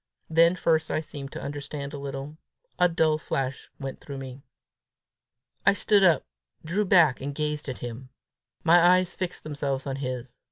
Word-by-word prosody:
Then 165 +2 +5
first 160 -2 +1
I - - 0
seemed 140 -3 -8
to - - -6
understand 140 0 -5
a 145 - -5
little. 140 +2 -6 0.4
A 180 - +5
dull 160 -2 +2
flash 135 -3 -3
went 135 -2 -6
through 140 -1 -8
me. 130 0 -8 1.2
I - - +5
stood 200 +1 +3
up, 170 -6 +4 0.4
drew 190 +6 0
back, 170 -8 +5
and 140 +1 -4
gazed 150 -1 -2
at 130 - -4
him. 120 +2 -7 0.5
My 170 +1 +6
eyes 180 +1 +4
fixed 185 -2 -4
themselves 140 -3 -3
on 135 -1 -3
his. 130 -2 -5
145 Hz, 165 wpm, -26 LUFS, 135-170 Hz, 1.2 s, My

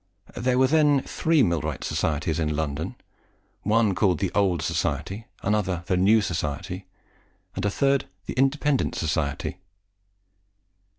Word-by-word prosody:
There 125 +1 +1
were 130 - +5
then 145 -1 +4
three 160 -4 +2
millwright 85 - -1
societies 80 +1 -1
in 75 -2 0
London: 75 0 -3 0.7
one 110 -1 +2
called 95 0 +2
the 95 -1 -1
Old 95 -4 +2
Society, 110 +5 -2 0.2
another 95 -4 0
the 90 - +1
New 100 +5 +4
Society, 90 +1 -3 0.7
and - - -3
a - - +3
third 135 +5 +1 0.2
the - - -4
Independent 135 +2 +1
Society. 75 -3 -2
95 Hz, 125 wpm, -25 LUFS, 85-125 Hz, 0.7 s, were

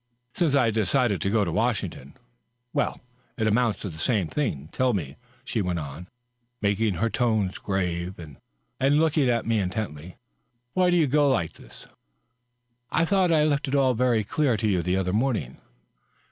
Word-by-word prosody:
" 125 0 -49
Since 165 -6 +1
I 125 -5 +3
decided 110 0 +1
to 100 - 0
go 105 -1 +2
to - - -2
Washington." 105 - -2 0.3
" 125 0 -51
Well, - - -1 0.4
it 110 - 0
amounts 110 0 +1
to 100 - -4
the 80 -2 -10
same 100 -5 0
ming... 80 - -2
Tell 130 -1 +1
me," 75 -8 -3 0.3
she 110 - -1
went 90 -2 -1
on, 80 +3 -7 0.5
making 100 -1 +1
her 115 +7 +1
tones 110 -6 0
grave 90 -2 -2
and 75 -5 -11 0.6
looking 155 -4 +2
at 115 -2 +1
me 115 -1 +1
intently, 90 -4 -4 0.3
" 125 0 -49
why 185 -1 +3
do 175 - +3
you 165 - +4
go 145 +1 +3
like 85 -11 0
this?" - - -15 0.5
" 125 0 -51 0.2
I 165 - +2
thought 185 -1 +2
I 155 -2 +4
lefli 145 -1 0
it 135 - -1
all 135 -2 +3
very 120 -2 +2
clear 135 0 +1
to 110 - -1
you 95 -4 +2
the 90 +2 0
other 95 -1 -1
morning." 110 - -1
110 Hz, 190 wpm, -25 LUFS, 95-130 Hz, 0.6 s, you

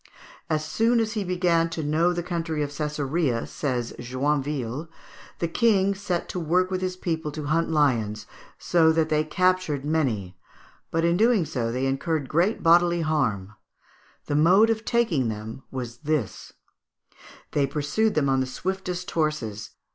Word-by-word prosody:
"As 155 -1 0
soon 225 +9 +2
as 220 -1 0
he 215 -3 -1
began 175 -2 +1
to 165 -1 -4
know 160 +4 +2
the 175 -1 -2
country 165 -3 -2
of 145 - -4
Cesarea," 150 -3 -1
says 125 -5 -3
Joinville, 135 +2 -2 0.5
"the 170 - -1
King 200 0 +2
set 190 -3 -3
to 180 - -3
work 180 +3 +1
with 185 0 -1
his 185 0 -2
people 160 -4 -2
to 150 -1 -5
hunt 165 +3 +1
lions, 115 -9 +1 0.3
so 165 -2 +3
that 160 -1 +1
they 155 0 +2
captured 180 -3 0
many; 120 - -1 0.5
but 165 +1 0
in 170 +1 +2
doing 220 -4 +3
so 115 -5 -2
they 130 +2 -1
incurred 140 +2 -1
great 175 +9 +1
bodily 170 0 +4
danger. 125 -12 0 0.8
The 145 - -2
mode 185 +9 +5
of 220 0 -3
taking 180 - +1
them 110 +3 -6
was 125 -3 -6
this: 155 -7 -3 1.0
They 140 -2 +1
pursued 150 +10 0
them 150 -3 +2
on 135 0 +2
the 130 - 0
swiftest 180 +4 -4
horses. 120 -10 -2
155 Hz, 155 wpm, -25 LUFS, 135-180 Hz, 1.0 s, mode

